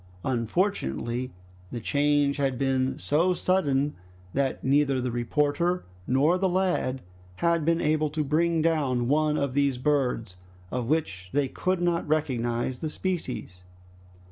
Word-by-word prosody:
Unfortunately 125 - -1 0.4
the 120 - -4
change 145 +3 +2
had 135 -3 0
been 130 0 0
so 165 +5 +1
sudden, 145 -7 +1 0.4
that 135 -1 -1
neither 140 0 +3
the 125 -1 -2
reporter 145 +8 0 0.2
nor 145 +8 +3
the 190 0 +2
lad 175 -8 0 0.3
had 170 - +1
been 165 0 +2
able 155 -1 +1
to 155 +1 -1
bring 160 +2 +1
down 140 -7 +1
one 150 +2 +2
of 140 -2 -1
these 140 -2 +2
birds, 125 -8 0 0.3
of 125 -2 -2
which 95 - -1
they 145 -1 +2
could 185 +6 -1
not 170 -2 0
recognize 125 -5 -1
the 155 - -3
species. 150 - -4
145 Hz, 135 wpm, -27 LUFS, 130-160 Hz, 0.4 s, neither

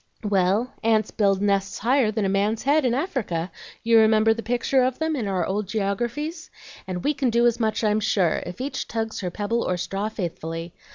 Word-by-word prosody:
"Well, 200 +4 +1
ants 220 -1 +2
build 200 -2 +1
nests 195 -1 0
higher 250 +1 +2
than 215 -1 -1
a - - +2
man's 200 +3 0
head 285 +1 +3
in 240 -1 +2
Africa; 225 - -2 0.3
you 230 0 +5
remember 220 0 +4
the 230 - -5
picture 245 +3 +1
of 255 0 +1
them 320 0 -1
in 235 -7 -2
our 185 -3 0
old 200 +1 -2
geographies? 240 - -3 0.4
And 180 -1 -4
we 295 - +2
can 275 -3 0
do 235 +1 +3
as 240 0 +2
much, 220 0 0
I'm 210 0 +2
sure, 200 -6 +1
if 180 - -8
each 270 +3 -3
tugs 225 -1 -3
her 180 - -3
pebble 210 +5 -1
or 180 - -1
straw 195 +4 -3
faithfully. 165 -4 -5
220 Hz, 205 wpm, -24 LUFS, 195-240 Hz, 0.4 s, you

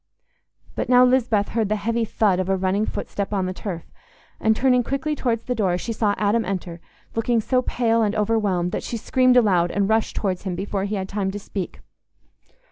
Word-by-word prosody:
But - - -3
now 250 0 +7
Lisbeth 245 -5 +2
heard 220 -3 -1
the 215 - +1
heavy 230 +2 -1
"thud" 205 -4 +1
of 185 0 -1
a 195 - +2
running 190 +3 0
footstep 200 0 -4
on 195 -3 0
the 185 - -3
turf, 180 -3 -5 0.6
and, 220 0 +3
turning 250 +1 +3
quickly 275 +5 -2
towards 230 -5 -1
the 250 - -2
door, 190 -6 +1
she 230 +5 -4
saw 210 -2 +1
Adam 215 +2 +1
enter, 180 -3 -5 0.3
looking 230 +1 +1
so 255 +3 +1
pale 230 -2 +1
and 210 -2 +1
overwhelmed 205 -5 +1
that - - -2
she 235 - -4
screamed 255 +2 +3
aloud 185 -7 +4
and 200 +2 0
rushed 220 0 +1
towards 185 -3 -1
him 185 -3 -3
before 195 +1 -2
he 205 +1 -2
had 190 -1 -3
time 195 -1 -2
to 195 - -4
speak. 195 -2 -6
210 Hz, 205 wpm, -23 LUFS, 195-230 Hz, 0.6 s, now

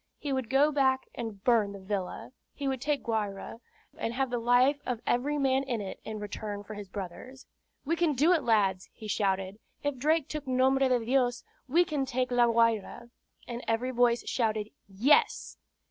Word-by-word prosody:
He 285 -2 -3
would 260 -4 -2
go 280 +3 +4
back 265 -2 +2
and 220 -4 -6
burn 225 -5 +3
the 200 - -8
villa. 190 +1 -4 0.2
He 280 - -3
would 265 -2 -2
take 295 0 -1
Guayra, 215 -2 -3 0.4
and 230 +1 -3
have 265 -1 0
the 245 - 0
life 250 +5 +3
of 245 -3 -3
every 280 +5 +1
man 270 -1 +2
in 255 -4 -2
it 195 -2 -6
in 220 -1 -5
return 205 0 -5
for 215 - -9
his 205 -2 -8
brother's. 205 +8 -8 0.4
"We 330 +4 +1
can 335 -2 +2
do 310 +8 +4
it, 330 - +2
lads!" 195 -6 +1
he 215 - -9
shouted. 195 -1 -1 0.2
"If 290 -2 -1
Drake 310 +3 +1
took 305 -3 -6
Nombre 260 +1 +3
de 245 -3 +1
Dios, 245 -1 +1 0.2
we 340 +7 +4
can 290 -5 -2
take 255 -1 -1
La 245 -1 +4
Guayra." 230 0 +1 0.4
And 240 0 -5
every 230 +3 0
voice 240 -1 +2
shouted, 220 -3 -1 0.2
"Yes." 230 +10 +2
245 Hz, 185 wpm, -29 LUFS, 215-270 Hz, 0.4 s, go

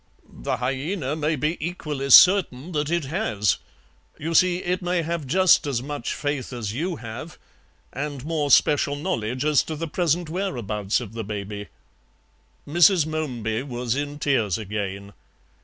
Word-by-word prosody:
"The - - -4
hyaena 135 +4 -2
may 155 0 0
be 150 +4 -1
equally 150 -5 -4
certain 175 -2 +6
that 150 -2 -1
it 170 -3 0
has. 135 - 0 0.6
You 165 +3 -3
see, 180 +1 +4
it 180 +1 -2
may 175 -1 0
have 165 -3 -3
just 180 +1 +4
as 125 -4 -1
much 145 -3 -4
faith 145 -3 -3
as 115 -5 -4
you 170 +8 -2
have, 120 +6 -8 0.6
and 145 -2 -5
more 155 -3 -1
special 145 +1 +4
knowledge 125 -2 -2
as 150 -2 +4
to 160 - -4
the 165 +2 -4
present 170 +1 0
whereabouts 120 - -2
of 110 -3 -8
the 115 -1 -4
baby." 105 0 -6 1.0
Mrs. 170 +2 +5
Momeby 125 -8 -2
was 125 -3 -3
in 145 +1 -3
tears 120 - +1
again. 100 -2 -5
145 Hz, 150 wpm, -24 LUFS, 120-165 Hz, 1.0 s, certain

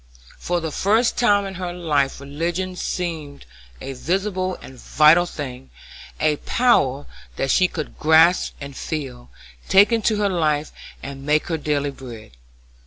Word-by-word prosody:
For 175 0 -1
the 160 -2 -4
first 220 - +2
time 205 -4 +3
in 195 - -6
her 180 -1 -3
life 150 -7 -1
religion 170 +6 -3
seemed 160 -6 -4 0.3
a 135 - -6
visible 185 +5 -2
and 130 -1 -13
vital 155 +7 +4
thing; 135 -5 -7 0.5
a 155 -1 +2
power 145 - +1 0.3
that 135 - -1
she 185 - +4
could 155 -4 -7
grasp 160 +3 +4
and 140 -1 -8
feel, 130 -7 -6 0.4
take 195 +4 +6
into 225 -1 +1
her 205 -1 +1
life 155 -4 0 0.3
and 135 0 -8
make 150 +2 +1
her 165 - 0
daily 145 -1 -1
bread. 120 - -11
155 Hz, 145 wpm, -22 LUFS, 140-185 Hz, 0.5 s, take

